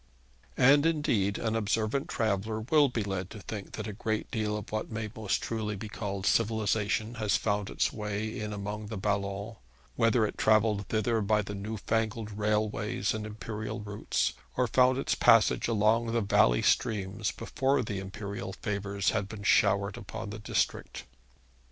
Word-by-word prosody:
And 145 +3 +6
indeed 120 -12 +1
an 110 -1 -1
observant 110 +4 0
traveller 110 0 -1
will 145 +4 +4
be 115 -3 -2
led 95 -2 -3
to 110 - -9
think 100 -1 -7
that - - -4
a 105 - -5
great 110 +1 -2
deal 105 -3 -1
of 105 - -8
what 110 0 -2
may 110 -1 -3
most 110 -3 -1
truly 110 -2 -2
be 105 +2 -7
called 100 -2 -4
civilisation 110 +1 +1
has 105 -2 +3
found 105 -2 -1
its - - 0
way 105 0 -3
in 105 0 -4
among 105 +1 -5
the 110 0 -5
Ballons, 100 +2 -2 0.4
whether 115 -1 +3
it - - -5
travelled 110 -2 +3
thither 110 +1 +1
by 105 +1 +2
the 105 - -6
new 105 +3 -4
fangled 110 +1 -1
railways 105 -1 0
and 110 -1 -4
imperial 110 0 -5
routes, 100 - -1 0.2
or 125 - +3
found 125 +2 +4
its 135 - 0
passage 115 -4 +4
along 115 +1 +2
the 115 0 +1
valley - - +3
streams 105 -2 +1
before 135 +1 0
imperial 100 -1 -4
favours 100 -2 -1
had 100 0 -2
been 105 -2 -8
showered 100 -1 +3
upon 105 +2 -6
the 105 - -6
district. 105 - -2
105 Hz, 165 wpm, -29 LUFS, 100-110 Hz, 0.4 s, And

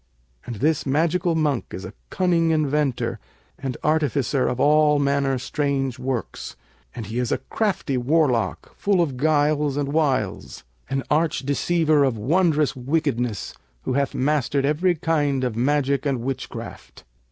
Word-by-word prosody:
And 120 - -4
this 150 +7 +1
magical 165 +4 +1
monk 150 -6 0
is 95 - -7
a 95 - -8 0.2
cunning 175 -3 +1
inventor 140 -7 0 0.4
and 130 -3 -4
artificer 145 -3 +1
of 125 0 -2
all 150 +1 +4
manner 140 -1 +1
strange 135 -1 -2
works; 130 -2 -4 0.4
and 115 - -5
he 110 +4 -4
is 125 -2 -1
a - - +2
crafty 195 -11 -2
warlock 125 -2 0
full 200 -2 +1
of 155 -6 +1
guiles 145 0 +1
and 145 -1 -2
wiles, 135 -11 -1 0.3
an 135 0 -1
arch 155 -2 +1
deceiver 155 +1 +2
of 130 -4 +1
wondrous 155 - +2
wickedness, 125 -5 -1 0.3
who - - -2
hath 140 +1 0
mastered 140 0 +1
every 170 +5 +2
kind 145 -4 0
of 125 -4 -1
magic 140 +2 +1
and 130 -4 -1
witchcraft. 135 +2 -7
140 Hz, 140 wpm, -23 LUFS, 130-155 Hz, 0.4 s, all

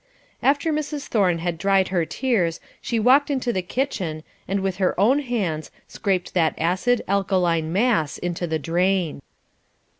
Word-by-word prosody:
After 285 +5 +2
Mrs. 295 -1 -3
Thorne 190 -6 +2
had 170 0 -3
dried 195 +1 +2
her 175 -3 +1
tears 195 -11 0 0.2
she 235 - -1
walked 260 +6 +5
to 245 -2 -1
the 185 - 0
kitchen, 180 - -3 0.2
and 195 0 -1
with 190 -1 -2
her 185 -2 0
own 245 +8 +4
hands 200 - -2 0.2
scraped 190 -4 -2
that 165 -3 +2
acid, 185 +9 +1
alkaline 180 -5 +1
mess 195 - +1
into 175 0 -3
the 160 -1 0
drain. 175 0 0
190 Hz, 150 wpm, -23 LUFS, 170-240 Hz, 0.2 s, walked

